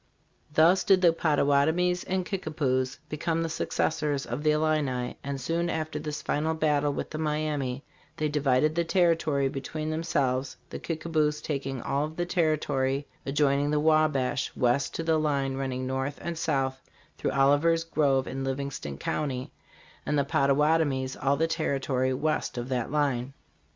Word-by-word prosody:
" - - -40
Thus 165 +5 +5
did 190 -2 +4
the 170 -2 +6
Pottawattomies 160 +3 +2
and 185 -1 -1
Kickapoos 145 -9 -1
become 165 +2 -1
the 165 - -2
successors 150 -3 -1
of 120 +5 -4
the 155 - +2
Illini, 150 -5 0
and 140 0 -4
soon 165 +6 -1
after 155 -1 -2
this 150 -1 -5
final 160 +2 0
battle 150 -2 +2
with - - -4
the 155 - -4
Miamis 150 -4 -1 0.4
they 155 - 0
divided 145 0 +2
the 170 +1 +1
territory 165 -5 +2
between 155 +3 -4
themselves, 135 -5 -1
the - - -5
Kickapoos 155 -2 -1
taking 135 -4 -4
all 140 +2 0
the 160 +3 -3
territory 150 -5 0 0.2
adjoining 140 0 +2
the 150 0 +2
Wabash 150 -5 +2
west 125 +3 +1
to 165 - -2
a 160 0 +2
line 140 -3 0
running 130 -1 -3
north 135 +2 -2
and 170 0 -4
south 135 -4 -1 0.4
through - - 0
Oliver's 145 +5 +3
Grove 140 -5 +1
in 135 +1 -4
Livingston 135 - -4
county, 130 - -3 0.5
'and 150 - 0
the 140 - +2
Pottawatomies 140 -2 +2
all 140 +1 +1
the 160 - +2
territory 135 -5 0
west 145 -1 -1
of 120 +1 -4
that 125 -1 -1
line." 135 -3 0
145 Hz, 155 wpm, -27 LUFS, 135-155 Hz, 0.5 s, the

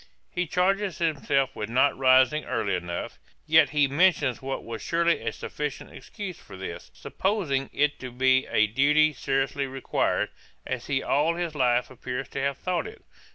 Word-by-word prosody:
He 180 -1 -2
charges 190 +1 +1
himself 140 -4 0
with 105 - -4
not 130 +4 +3
rising 130 +3 +4
early 100 -2 -1
enough; 90 -1 -4 0.3
yet 160 -1 +5
he 145 -1 +3
mentions 145 -4 +2
what 135 0 -4
was 115 -1 -6
surely 170 0 +1
a - - -2
sufficient 150 -2 -5
excuse 200 -6 -8
for 95 - -12
this, 95 -2 -7
supposing 170 -10 -2
it 150 +1 +1
to 130 -1 -7
be 130 +1 +2
a 110 - +3
duty 150 +7 +3
seriously 135 +1 -1
required, 135 0 -1 0.4
as 130 -2 -4
he 140 -2 0
all 150 +4 +2
his 170 -2 -3
life 125 -4 +1
appears 130 +1 -5
to 135 - -4
have 140 0 -1
thought 185 - -2
it. 435 - -12
140 Hz, 165 wpm, -26 LUFS, 130-160 Hz, 0.4 s, yet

